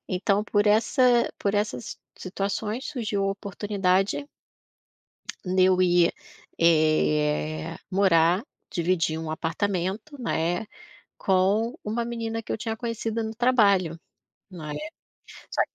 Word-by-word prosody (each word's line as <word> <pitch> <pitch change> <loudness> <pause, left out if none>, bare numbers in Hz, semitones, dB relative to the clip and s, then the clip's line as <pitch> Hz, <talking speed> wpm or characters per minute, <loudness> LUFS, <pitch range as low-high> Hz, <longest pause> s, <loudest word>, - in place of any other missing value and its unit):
Então 200 +3 +1
por 205 0 +1
essa 240 +3 +3
por 200 0 0
essa 205 - 0
si - - -7 0.2
situações 205 +5 -3
surgiu 220 -8 -2
a 195 - +1
oportunidade 200 +4 -1 1.2
de 185 0 +2
eu 185 0 +4
ir, 175 -1 +4 0.5
eh, 155 0 +2
morar, 185 0 +3 0.3
dividir 165 -2 0
um 160 -1 -5
apartamento, 190 - -2
né, 175 -2 -1 0.5
com 200 +5 +2
uma 225 +3 -1
menina 225 -1 -3
que - - -13
eu - - -1
tinha 225 0 -3
conhecido 230 -1 -3
no 220 0 -4
trabalho, 200 -9 +3 0.5
né? 155 -5 -7 0.8
Só - - -1
195 Hz, 115 wpm, -26 LUFS, 175-225 Hz, 1.2 s, eu